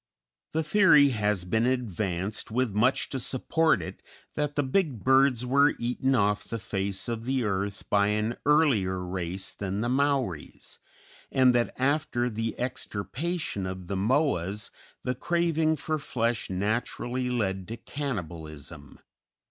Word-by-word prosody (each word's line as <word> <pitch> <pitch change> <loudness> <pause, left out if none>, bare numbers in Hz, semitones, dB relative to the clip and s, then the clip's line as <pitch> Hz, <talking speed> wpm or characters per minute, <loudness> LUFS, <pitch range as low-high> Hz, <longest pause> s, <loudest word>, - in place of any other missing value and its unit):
The 160 +1 +1
theory 155 -5 +6
has 105 -5 0
been 110 +6 +1
advanced, 105 -6 -2
with 120 -1 0
much 115 +6 +2
to 135 - -2
support 135 - +1
it, - - -8 0.3
that 150 -1 -2
the 145 - +2
big 135 - 0
birds 130 -2 +4
were 140 +3 +4
eaten 125 +3 0
off 105 -2 +2
the 115 - -4
face 100 -1 -3
of 115 -1 -3
the 130 0 0
earth 100 -1 -2
by 100 0 +3
an 105 +2 0
earlier 135 -11 +3
race 90 +1 -4
than 100 +1 -3
the 120 - 0
Maoris, 130 - -1 0.5
and 130 -2 +5
that 120 -1 +1
after 130 -3 +1
the 115 +1 -3
extirpation 125 - -3
of 95 0 -6
the 100 - -3
Moas 105 - 0 0.3
the 125 - 0
craving 160 +2 +1
for 155 +1 -2
flesh 115 -4 -1
naturally 120 +6 -1
led 95 -6 -1
to 115 - -6
cannibalism. 85 - -6
120 Hz, 140 wpm, -27 LUFS, 100-135 Hz, 0.5 s, theory